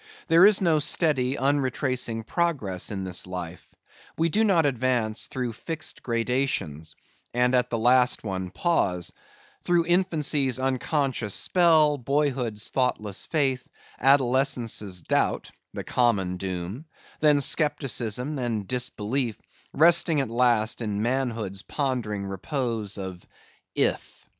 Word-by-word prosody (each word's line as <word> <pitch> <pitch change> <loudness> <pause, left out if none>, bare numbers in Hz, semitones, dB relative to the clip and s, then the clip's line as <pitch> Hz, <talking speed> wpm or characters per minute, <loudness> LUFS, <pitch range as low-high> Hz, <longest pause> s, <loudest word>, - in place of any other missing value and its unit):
There 170 +4 +7
is 210 -2 +4
no 165 -4 +3
steady 145 -4 +1
unretracing 130 -4 -1
progress 130 - -1
in 95 -2 -4
this 90 -1 -1
life; 90 -1 -7 0.5
we 165 +1 +1
do 215 +7 +2
not 180 -7 +3
advance 125 -4 0
through 125 -3 -4
fixed 155 +6 -4
gradations, 115 - -2 0.4
and 125 +1 +2
at 125 -1 +2
the 115 - -1
last 125 +2 +3
one 95 -3 -4
pause:—through 165 - -2
infancy's 155 -7 +1
unconscious 130 - -1
spell, 160 -5 +3
boyhood's 125 -5 -1
thoughtless 110 -6 -1
faith, 135 -5 0 0.3
adolescence' 125 - +1
doubt - - 0 0.2
(the - - -6
common 100 -7 0
doom), 95 - -5 0.3
then 150 -1 +4
scepticism, 135 -3 +1
then 115 -5 -2
disbelief, 125 0 -2 0.3
resting 165 0 +4
at 135 - -1
last 120 -2 +1
in 105 -2 -2
manhood's 115 -6 -2
pondering 120 -9 -3
repose 110 - -3
of 95 -2 -7 0.5
If. - - -1
125 Hz, 115 wpm, -25 LUFS, 105-145 Hz, 0.5 s, There